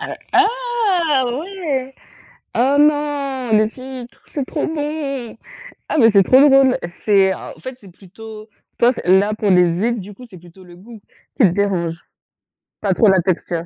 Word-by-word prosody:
Heu, - - -6 0.2
ah, 410 - +1
ouais! 280 -1 -4 0.6
Ah 270 +4 +2
non, 290 -4 0
les 215 0 +2
huîtres, 255 -2 -11
c'est 280 -3 -4
trop 295 - -3
bon! 290 -6 -5 0.5
Ah, - - -2
mais 230 -4 +6
c'est 200 -2 +5
trop 255 +8 +4
drôle! 270 -2 +4 0.3
C'est 195 -2 +3
en - - -10
fait, 255 -1 -8
c'est 200 -5 -16
plutôt 215 +4 -13 0.3
toi, 240 +2 +4
c - - -7
là, 190 +4 +3
pour 210 -1 -1
les 180 -1 +4
huîtres, 215 +7 -1
du 200 +2 -10
coup, 250 - -14
c'est 210 -7 -14
plutôt 175 +2 -17
le 175 -1 -15
goût 220 +4 -14 0.4
qui 255 - +3
te - - +6
dérange? 175 -3 -2 0.8
Pas 200 -3 +1
trop 215 +3 +3
la 190 -1 +3
texture? 170 -1 -3
235 Hz, 170 wpm, -18 LUFS, 195-280 Hz, 0.8 s, mais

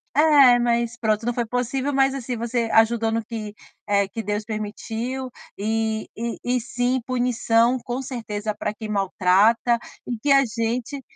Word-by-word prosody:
É, 285 -5 +6
mas, 235 -1 0
pronto, 220 -1 0
não 240 - 0
foi 240 -1 -1
possível, 250 +4 -2
mas, 270 0 +3
assim 250 -2 -4
você 235 0 -2
ajudou 225 0 +3
no 225 -1 -1
que, 215 -2 -7 0.3
eh, 200 -1 +2
que 225 - -5
Deus 210 0 -2
permitiu, 225 +4 -4 0.3
e 220 +1 -1
e 235 0 -3
e 250 0 +1
sim, 245 +2 -1
punição, 245 -1 +2
com 250 +2 -4
certeza, 220 -5 -4
para 210 0 -3
quem 215 0 -8
maltrata, 205 +4 +3 0.3
e 240 -2 -3
que 290 - -2
a 275 0 +6
gente 235 +4 -3
235 Hz, 160 wpm, -23 LUFS, 220-250 Hz, 0.3 s, É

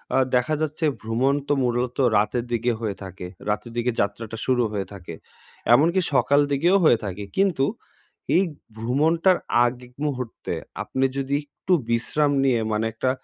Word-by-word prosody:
আ - - +4 0.2
দেখা 125 +5 +2
যাচ্ছে 155 +1 -1 0.2
ভ্রমণ 115 +5 +1
তো - - +2
মূলত 125 0 -1 0.2
রাতের 105 +3 +1
দিকে 120 0 +1
হয়ে 105 -3 -2
থাকে। 95 -1 -8 0.2
রাতের 105 +3 -2
দিকে 120 +1 +1
যাত্রাটা 110 +2 -3
শুরু 125 -2 +2
হয়ে 100 -2 -3
থাকে। 90 -4 -9 0.6
এমনকি 170 +8 +4
সকাল 140 +1 +4
দিকেও 170 +8 +3
হয়ে 135 -7 +6
থাকে। 100 +1 -5
কিন্তু 185 -9 +3 0.7
এই 185 - +5 0.3
ভ্রমণটার 160 +10 +2 0.3
আগ 120 +1 0 0.3
মুহূর্তে 130 -5 -4 0.3
আপনি 130 0 0
যদি 135 +1 -1
একটু 145 +5 -3 0.2
বিশ্রাম 140 +5 +1
নিয়ে, 130 -4 +3
মানে 110 +1 0
একটা 120 +4 -1
125 Hz, 150 wpm, -24 LUFS, 115-145 Hz, 0.7 s, হয়ে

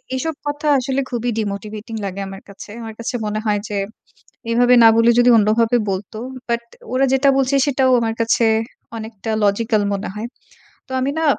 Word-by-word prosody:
এসব 320 +5 -2
কথা 290 +1 -3
আসলে 265 +1 -1
খুবই 240 0 -1
ডিমোটিভেটিং 210 +2 -5
লাগে 195 +1 -4
আমার 195 0 -9
কাছে। 200 - -11
আমার 225 -1 -7
কাছে 230 +2 -4
মনে 215 0 -2
হয় 205 -1 +2
যে 205 - -2 0.7
এভাবে 245 +1 +4
না - - +10
বলে 230 +1 +5
যদি 245 0 +6
অন্যভাবে 225 +3 +3
বলতো। 195 +3 -5 0.3
বাট 235 0 0 0.3
ওরা 265 +1 +2
যেটা 270 +1 +3
বলছে 270 +1 +1
সেটাও 265 -2 +2
আমার 225 -1 -1
কাছে 230 +1 +2 0.5
অনেকটা 220 0 -6
logical 215 +1 +1
মনে 200 - -4
হয়। 215 +2 -4 0.6
তো - - -9
আমি 265 +2 0
না, 320 - 0
230 Hz, 175 wpm, -19 LUFS, 210-255 Hz, 0.7 s, না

